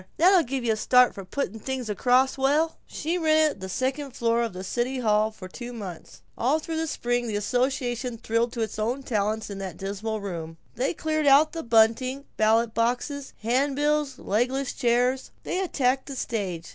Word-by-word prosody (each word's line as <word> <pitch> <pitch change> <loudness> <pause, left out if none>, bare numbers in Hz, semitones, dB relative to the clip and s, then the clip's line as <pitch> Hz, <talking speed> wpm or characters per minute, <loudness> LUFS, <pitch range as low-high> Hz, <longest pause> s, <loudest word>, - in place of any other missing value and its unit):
That'll 365 +2 +6
give 270 -3 -3
you 230 -2 +2
a - - -4
start 250 +3 +5
for 195 - -8
putting 190 +3 -3
the 225 - -8
thing 260 +1 -4
across 250 +5 +3
swell!" 290 +4 +1
She 335 +4 -2
rented 310 - +3
the 190 - -5
second 260 +5 -2
floor 235 -1 +1
of 230 -2 -1
the 185 0 -7
city 245 +6 -1
hall 215 -3 +2
for 200 -4 -10
two 240 +6 -8
months. 195 -7 -9
All 265 +6 +2
through 320 +1 -4
the 325 0 -1
spring 245 -4 -1
the 215 - -2
association 245 +2 -1
thrilled 230 +2 0
to 235 - -3
its 220 -1 -3
own 245 +6 -1
talent 215 -2 -1
in 195 - -6
that 190 -4 -6
dismal 205 +3 -3
room. 165 -5 -6 0.2
They 265 +7 -1
cleared 310 -1 -1
out 285 +3 +6
the 330 - -4
bunting, 235 +4 +2
ballot 220 +1 +3
boxes, 250 +4 -1
handbills, 285 +4 +1
legless 250 +6 -1
chairs. 250 +1 +1
They 365 - -2
attacked 270 -8 0
the 275 - -6
stage. 195 -9 -3
245 Hz, 185 wpm, -26 LUFS, 220-275 Hz, 0.2 s, That'll